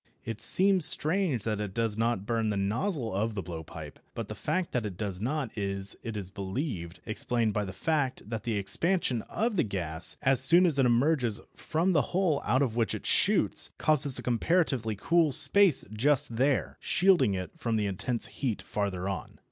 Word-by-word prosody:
It 115 -2 -5
seems 190 - +4
strange 165 - +1
that 105 -2 -2
it 100 -3 -6
does 115 -2 0
not 115 -3 -1
burn 115 -1 -1
the 105 - -2
nozzle 115 - -2
of 110 +3 -2
the 100 - -4
blowpipe, 80 -2 -9 0.2
but - - -5
the - - -4
fact 170 +3 -3
that 125 - -1
it 100 -5 -6
does 100 -3 -4
not 135 0 -3
is, 100 -1 -3
it 115 -2 -6
is 95 -2 -6
believed, 95 - -5
explained 115 0 -1
by 105 0 -1
the 95 - -6
fact 135 - -2
that 110 0 -4
the 115 -2 -3
expansion 130 - 0
of 225 -1 -1
the - - +3
gas, 85 -6 -4
as 135 -2 +4
soon 175 +7 +7
as 155 -6 +1
it 130 - +4
emerges 120 -2 +1 0.2
from 165 +4 -1
the 155 -5 +3 0.2
hole 175 -7 +1
out 130 +7 +1
of 115 -5 -2
which 115 -2 0
it - - -8
shoots, - - +2
causes 145 -3 +3
a - - -4
comparatively 125 -3 0
cool 165 - +2
space 195 +3 +6
just 125 +1 +1
there, 130 - 0
shielding 170 - +2
it 90 -1 -5
from 120 -8 -2
the 105 -1 0
intense 105 +5 -2
heat 125 -7 -3
farther 95 -3 -3
on. 100 -1 -6
115 Hz, 190 wpm, -28 LUFS, 100-150 Hz, 0.2 s, soon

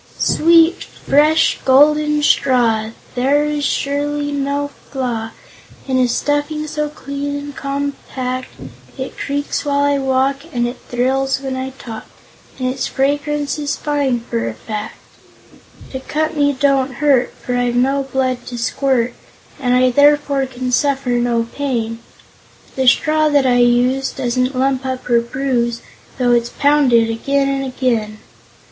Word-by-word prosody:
"Sweet, 330 +1 +4 0.2
fresh, 305 +3 +4
golden 300 +2 +4
Straw! 235 -6 +2 0.2
There 275 +4 +2
is 300 -1 -2
surely 290 +1 -1
no 285 0 -1 0.2
flaw 240 -5 -3 0.6
In 260 -1 +1
a 250 - +3
stuffing 290 +4 -1
so 300 0 -3
clean 285 0 -5
and 285 0 -6
compact. 275 -2 -4 0.5
It 260 0 -5
creaks 285 +1 -3
when 285 -1 -1
I 285 0 +2
walk, 265 +1 +1
And 240 -3 0
it 245 +1 -6
thrills 265 +2 0
when 265 -1 -4
I 260 0 -3
talk, 225 -4 -8 0.5
And 255 - -2
its 255 0 -2
fragrance 290 +2 -1
is 290 -1 -2
fine, 285 -5 0
for 115 - -3
a 110 - -7
fact. 215 - -6 1.0
"To 260 - -4
cut 310 +4 -2
me 285 -1 +3
don't 270 -1 +1
hurt, 275 -3 +2
For 250 - -4
I've 245 -1 0
no 270 +3 +2
blood 255 -2 -1
to 245 - -6
squirt, 245 0 0 0.5
And 250 -2 +1
I 255 0 +4
therefore 285 0 +3
can 255 0 -4
suffer 275 0 +1
no 240 -1 +1
pain; 230 -3 -3 0.8
The 265 -1 0
straw 310 +4 +3
that 285 -2 +3
I 250 -1 +3
use 245 +2 +3
Doesn't 255 0 -1
lump 265 0 +1
up 260 -1 -4
or 235 -1 +5
bruise, 235 -1 -1 0.4
Though 245 -1 +2
it's 235 0 +2
pounded 265 -6 +3
again 275 +5 0
and 275 0 -1
again! 235 -5 -1
265 Hz, 145 wpm, -18 LUFS, 245-285 Hz, 1.0 s, or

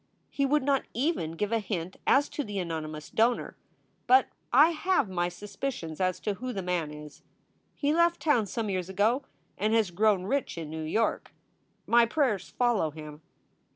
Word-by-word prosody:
He 275 -1 +1
would 295 +1 +2
not 275 -1 +1
even 245 - 0
give 205 +5 -2
a 230 - +2
hint 185 -4 -4
as 285 +1 +4
to 295 - -3
the 205 -4 -6
anonymous 155 -4 -4
donor, 235 +2 +1 0.5
but 260 +1 +5 0.2
I 295 +7 +7
have 360 - +1
my 175 -1 0
suspicions 195 - -5
as 185 -1 0
to 210 - -1
who 250 +5 -5
the 195 - -4
man 175 -4 -1
is. 150 0 -11 0.5
He 290 0 +1
left 340 +1 +3
town 245 -9 +2
some 220 -1 -3
years 185 -1 -2
ago 215 +7 +2 0.4
and 215 +2 +2
has 215 -5 +2
grown 200 0 +2
rich 265 0 -2
in 160 -2 -6
New 160 0 -5
York. 215 +9 -1 0.5
My 235 0 +5
prayers 250 -7 0
follow 240 -10 +1
him. 150 0 -10
210 Hz, 175 wpm, -28 LUFS, 175-260 Hz, 0.5 s, I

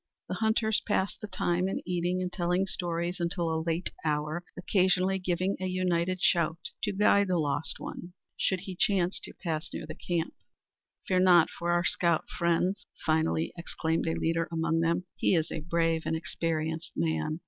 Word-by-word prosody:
The - - -3
hunters 220 0 +2
passed 200 -2 0
the 215 - -5
time 180 -1 0
in - - -2
eating 180 +1 0
and 180 - -4
telling 180 +1 +1
stories 175 -1 -2
until 170 -1 0
a 160 - 0
late 165 +2 -1
hour, 155 +2 -1
occasionally 185 +1 +2
giving 185 +1 0
a 185 - -2
united 185 0 0
shout 170 -1 +3 0.2
to 205 - 0
guide 200 0 +4
the 180 -1 +1
lost 145 0 -1
one 175 +1 -7 0.2
should 190 -2 0
he 190 -1 -7
chance 190 -2 +2
to - - -8
pass 160 -3 -2
near - - -5
their 155 0 -7
camp. 170 -2 -2 0.7
"Fear 185 -1 +3
not 180 -3 +6
for 170 - -4
our 175 0 +2
scout, 170 -2 +2
friends!" 175 +3 0 0.2
finally 160 +1 +1
exclaimed 165 -1 -2
a 160 - +1
leader 165 0 0
among 165 0 +1
them. 165 +2 +1
"He - - +3
is 160 -2 0
a - - -2
brave 165 0 +1
and 160 - +1
experienced 160 0 -2
man. 80 - 0
175 Hz, 175 wpm, -29 LUFS, 165-185 Hz, 0.7 s, not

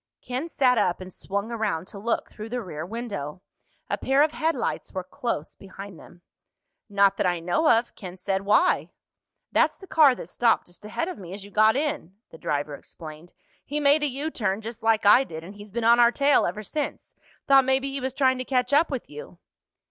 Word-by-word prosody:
Ken 255 +7 -4
sat 255 -6 +3
up 175 - +1
and 185 -1 -9
swung 200 +4 -4
around 210 -8 -2
to 200 - -10
look 230 +3 -1
through 215 +1 -9
the 245 +2 -2
rear 165 -8 -6
window. 185 -6 -6 0.4
A - - -2
pair 270 +2 +3
of 305 - +1
headlights 320 +1 -2
were 185 -2 -3
close 185 -5 -4
behind 195 -2 -11
them. 175 0 -16 0.7
"Not 200 -1 +3
that - - +1
I 175 -1 0
know 180 - +1
of," 230 +1 +3
Ken 185 -2 -9
said. 190 +1 -1
"Why?" 210 - +3 0.6
"That's - - +2
the 385 - -12
car 310 -7 +5
that 165 - -8
stopped 230 +5 +2
just 175 +2 -14
ahead 325 +10 -3
of 370 - -6
me 180 -1 -9
as 200 - -8
you 205 - -13
got 215 +2 +4
in," 270 - -2 0.2
the 160 - -13
driver 145 0 -2
explained. 155 +3 -11 0.3
"He 295 +1 -3
made 290 +1 +4
a 295 - +2
U 285 +4 -3
turn, 200 -5 -1
just 225 +1 -8
like 225 -1 +2
I 225 +6 +7
did, 160 -9 -8
and 185 +4 -10
he's 205 0 -12
been 235 +3 -3
on 235 +1 +6
our 235 0 +6
tail 280 +2 +3
ever 210 +5 -4
since. 300 +7 -5 0.3
Thought 270 -1 +6
maybe 265 +1 +1
he 275 0 -4
was 260 0 -3
trying 260 -2 +2
to - - -2
catch 255 0 0
up 310 +3 +4
with 265 -5 -4
you." 150 +4 -10
220 Hz, 215 wpm, -25 LUFS, 185-265 Hz, 0.7 s, I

